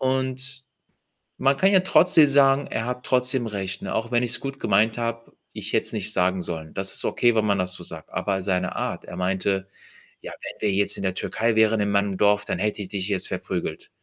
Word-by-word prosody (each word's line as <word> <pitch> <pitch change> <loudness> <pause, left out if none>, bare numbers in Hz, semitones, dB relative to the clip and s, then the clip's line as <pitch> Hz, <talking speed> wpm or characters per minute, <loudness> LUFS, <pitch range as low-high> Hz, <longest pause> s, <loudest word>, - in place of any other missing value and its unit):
Und 130 +1 -2 0.8
man 135 +1 +3
kann 195 +5 +3
ja 190 - +6
trotzdem 180 -3 +5
sagen, 140 0 +4
er 115 - -3
hat 125 0 -4
trotzdem 125 -1 +2
recht, 95 -3 -5
ne? - - -4
Auch 115 +1 -2
wenn 120 0 +2
ich's 120 -1 +1
gut 135 0 -6
gemeint 110 +2 +2
habe, 115 0 -4 0.2
ich - - -6
hätte - - +1
es - - +1
nicht - - 0
sagen 90 0 +1
sollen. 80 -2 -6
Das 95 0 +1
ist - - +1
okay, 120 -1 +2
wenn 110 -1 +2
man 100 -2 +1
das 90 0 -1
so 90 - -10
sagt. 80 -1 -10
Aber 95 +1 -2
seine 90 -1 -1
Art, - - -3
er - - -9
meinte: 95 +1 -1 0.5
„Ja, - - -8
wenn - - -9
wir - - +1
jetzt 100 +1 +2
in - - -5
der 95 -1 0
Türkei 115 +4 -1
wären, 110 0 +3
in 100 0 0
meinem 100 -1 0
Dorf, 105 0 +3
dann - - -3
hätte 105 0 -1
ich 95 - -6
dich 95 -2 -3
jetzt 95 -2 0
verprügelt.“ 90 -3 -4
105 Hz, 225 wpm, -24 LUFS, 95-125 Hz, 0.8 s, ja